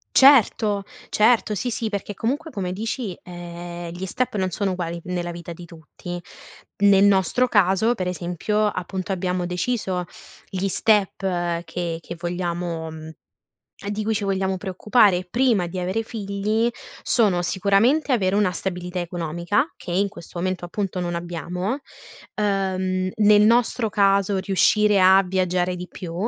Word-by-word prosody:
Certo, 225 -6 +5 0.3
certo, 215 -1 +3
sì, 245 - -2
sì, 225 0 -2
perché 205 0 -4
comunque, 285 - -2
come 185 -6 -3
dici, 220 -1 -4
ehm, 175 -1 -7
gli 180 +2 -5
step 250 +4 -2
non 190 -2 0
sono 195 +2 -1
uguali 170 -2 -3
nella 175 -1 -3
vita 170 0 -8
di 175 - -11
tutti. 170 +1 -9 0.6
Nel 200 0 +6
nostro 200 +5 +3
caso, 205 +2 +3
per 185 -4 -3
esempio, 180 +5 -1
appunto, 190 0 -3
abbiamo 180 -1 -1
deciso 180 0 -2 0.5
gli 190 +1 -2
step 205 0 +2 0.5
che 170 -1 -4
che 170 - -7
vogliamo 175 -2 -3
mhmm, 155 0 -9 0.8
di 210 +1 -2
cui 220 - +1
ci 210 -1 -2
vogliamo 190 -1 0
preoccupare, 190 0 +2
prima 230 -6 +2
di 185 - -7
avere 185 +5 -1
figli, 215 +1 -1 0.3
sono: 200 -7 +2
sicuramente, 200 - +2
avere 195 -5 +1
una 205 -3 +3
stabilità 180 0 -4
economica, 175 - -1
che - - -8
in 195 +3 +2
questo 175 -2 -11
momento, 185 0 -2
appunto, 185 +1 -3
non 175 -1 -2
abbiamo, 175 - -3 0.6
ehm, 190 -2 0
nel 210 -1 +5
nostro 230 +1 +3
caso 200 -1 +2
riuscire 200 +1 +3
a 190 +1 +7
viaggiare 180 -1 0
di 180 0 -7
più, 175 -4 -7
190 Hz, 145 wpm, -23 LUFS, 175-210 Hz, 0.8 s, a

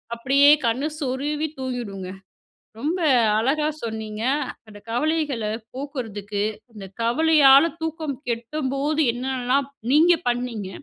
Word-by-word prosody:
அப்படியே 270 +4 +3 0.2
கண்ணு 250 +6 0
சொருவி 290 +3 -2
தூங்கிடுங்க. 225 -8 -5 0.7
ரொம்ப 325 +7 -1 0.4
அழகா 290 +7 +1 0.2
சொன்னீங்க. 220 -1 -5 0.4
அந்த 205 -1 -12
கவலைகள 290 -2 -1 0.3
போக்குறதுக்கு, 220 -7 -4 0.3
அந்த 200 -2 -9 0.2
கவலையால 285 +4 +5
தூக்கம் 315 -3 -3
கெடும்போது 275 +5 -1
என்னெல்லாம் 260 +2 -1 0.3
நீங்க 330 +4 +6 0.2
பண்ணீங்க, 240 -5 -3
260 Hz, 95 wpm, -23 LUFS, 230-295 Hz, 0.7 s, நீங்க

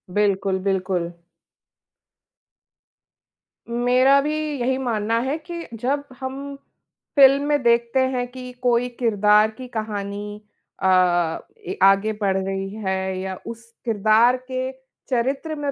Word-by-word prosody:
बिल्कुल, 195 -2 +1
बिल्कुल। 185 -3 -1 2.6
मेरा 250 +3 +4
भी 300 +2 -1 0.2
यही 260 +2 0
मानना 230 -3 0
है 265 +5 -1
कि, 340 +1 -8
जब 270 +6 -1 0.2
हम 275 +2 -6 0.6
फ़िल्म 275 0 +6
में 295 -1 +2
देखते 235 +2 +2
हैं 255 -1 0
कि 255 -1 -8
कोई 245 0 +2
किरदार 210 -2 +4
की 255 -1 -8
कहानी 210 -2 -5 0.4
अ, 175 -3 +3 0.3
ए 385 +2 -5
आगे 195 +2 +5
बढ़ 195 -2 +1
रही 195 0 -3 0.2
है 190 0 -1
या 190 0 -4
उस 230 0 -7 0.2
किरदार 220 +3 +4 0.2
के 255 0 -2 0.4
चरित्र 270 +5 -1
में 290 -1 -2
235 Hz, 120 wpm, -22 LUFS, 195-260 Hz, 2.6 s, फ़िल्म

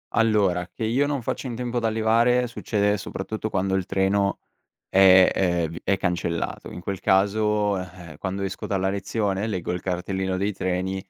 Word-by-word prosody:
Allora 100 -6 +2
che - - -6
io 125 +6 +1
non 140 -4 -2
faccio 130 - -3
in 120 - -4
tempo 120 0 -3
ad 115 - -1
arrivare, 115 +3 +3
succede 105 -3 0
soprattutto 110 +3 -5
quando 95 -1 -1
il 95 -1 0
treno 100 +1 +1 0.5
è 95 -1 +7
ehm, 90 -3 +1
è - - -7
v 85 - -9
è 100 - +2
cancellato. 85 -1 -2
In 90 - -8
quel 95 +2 -4
caso, 105 +1 +2
eh, 90 -4 -9
quando 95 0 -4
esco 95 0 -4
dalla 95 -1 0
lezione, 100 +1 -1
leggo 95 -6 -3
il 90 - -4
cartellino 95 +1 -2
dei 100 +2 0
treni 95 0 -2
95 Hz, 180 wpm, -24 LUFS, 95-110 Hz, 0.5 s, è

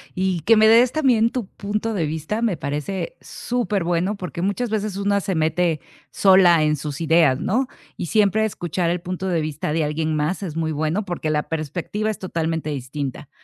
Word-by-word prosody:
y 185 -2 0
que 225 +9 +5
me 220 0 +6
des 235 +2 +6
también 250 -7 +3
tu 235 -4 -4
punto 210 +3 -3
de 175 -6 0
vista. 160 +8 -3
Me 225 -6 +1
parece 155 - -4
súper 230 -6 -2
bueno, 175 +4 0
porque 180 -3 -6
muchas 205 +6 -1
veces 215 -2 -2
una 200 0 +1
se 195 -1 -2
mete 160 0 +1 0.3
sola 185 -4 +5
en 150 0 +2
sus 145 +1 -5
ideas, 160 -5 +4
¿no? 250 +9 +1 0.3
Y - - -3
siempre 215 +2 +3
escuchar 175 -4 -2
el 175 0 -1
punto 185 +1 -4
de 170 -3 +1
vista 150 -1 -3
de 160 0 +1
alguien 155 +1 -1
más 155 +6 -1
es 175 -6 -5
muy 160 -1 -1
bueno, 155 +7 -1
porque 175 -4 -3
la 150 -1 +1
perspectiva 165 +7 -3
es 215 - -3
totalmente 165 -3 -2
distinta. 140 0 -5
175 Hz, 190 wpm, -22 LUFS, 155-205 Hz, 0.3 s, me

